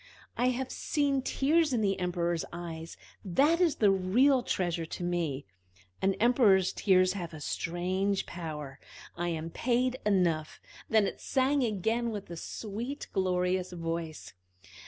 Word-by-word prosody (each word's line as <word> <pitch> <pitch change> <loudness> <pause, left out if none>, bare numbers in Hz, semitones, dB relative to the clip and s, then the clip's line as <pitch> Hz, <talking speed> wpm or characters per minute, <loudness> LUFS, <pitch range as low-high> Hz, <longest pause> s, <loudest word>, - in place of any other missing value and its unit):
"I 245 - +2
have 255 +1 -1
seen 280 -2 0
tears 295 +3 +2
in 235 - +1
the 195 -2 +1
Emperor's 175 -2 -1
eyes 165 -1 -7 0.3
that 290 - +3
is 340 -4 +3
the 205 -3 +4
real 240 +9 +3
treasure 175 -7 -1
to 175 - -6
me. 170 -6 -1 0.6
An 195 0 +2
Emperor's 215 -6 +4
tears 185 -2 +3
have 175 -5 -6
a - - -8
strange 185 +6 -1
power. 150 -5 -7 0.4
I 175 0 -2
am 165 -1 -3
paid 250 +4 0
enough!" 175 -6 +1 0.3
Then 220 -2 +4
it - - -4
sang 275 +1 +1
again 225 +2 0
with 205 -5 -6
a - - -5
sweet, 230 - -5
glorious 185 -1 0
voice. 165 -2 -5
190 Hz, 140 wpm, -30 LUFS, 170-240 Hz, 0.6 s, the